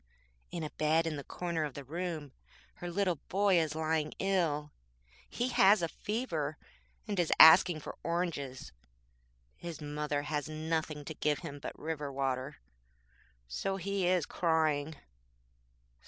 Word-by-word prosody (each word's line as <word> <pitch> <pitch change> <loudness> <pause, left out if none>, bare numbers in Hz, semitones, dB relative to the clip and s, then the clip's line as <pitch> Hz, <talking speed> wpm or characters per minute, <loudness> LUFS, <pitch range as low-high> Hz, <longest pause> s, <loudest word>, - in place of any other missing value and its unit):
In 170 - -4
a 150 - -4
bed 155 +2 +2
in 160 -2 -2
the 140 - -6
corner 170 0 -3
of 145 -3 -4
the 140 - -6
room 160 -1 -4 0.5
her 175 - -5
little 180 -1 0
boy 195 -2 +4
is 155 -2 -1
lying 155 -1 0
ill. 165 -6 0 0.6
He 245 +1 -1
has 195 -5 +5
a - - +2
fever, 165 - -3 0.5
and 200 -3 -2
is 170 - +1
asking 160 0 +9
for - - -7
oranges. 165 -7 -3 0.9
His 170 -3 -7
mother 150 -1 -2
has 150 -1 -2
nothing 155 -1 -2
to 160 - -5
give 150 -1 0
him 145 -2 -6
but - - -7
river 150 -2 -4
water, 130 - -2 0.9
so 190 - -2
he 195 0 -1
is 180 -4 +2
crying. 160 -3 +1
160 Hz, 140 wpm, -32 LUFS, 150-175 Hz, 0.9 s, asking